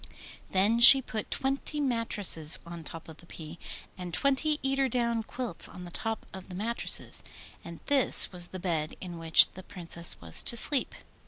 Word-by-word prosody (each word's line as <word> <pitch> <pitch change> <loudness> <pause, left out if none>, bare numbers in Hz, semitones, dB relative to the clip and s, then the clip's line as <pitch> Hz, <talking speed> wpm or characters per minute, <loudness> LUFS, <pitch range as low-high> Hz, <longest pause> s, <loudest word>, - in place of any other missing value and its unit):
Then 205 +5 +1
she 245 +3 +10
put 220 -4 -6
twenty 275 +3 -3
mattresses 215 - +1
on 170 -1 -10
top 165 +1 -9
of 160 -1 -13
the 170 - -18
pea, 160 0 -9 0.4
and 180 -1 -8
twenty 280 - -1
eider 270 0 0
down 235 -1 -2
quilts 235 -4 -5
on 180 - -11
the 175 - -11
top 225 +4 -5
of 190 0 -11
the 180 - -9
mattresses. 230 +5 -2 0.4
And 170 -1 -11
this 275 -3 +3
was 175 -2 -4
the 185 - -9
bed 165 -4 -4
in 175 -2 -9
which 165 -1 +5
the 185 - -12
Princess 170 -3 -3
was 80 -1 +3
to 235 - 0
sleep. 275 +3 +3
190 Hz, 175 wpm, -27 LUFS, 170-245 Hz, 0.4 s, she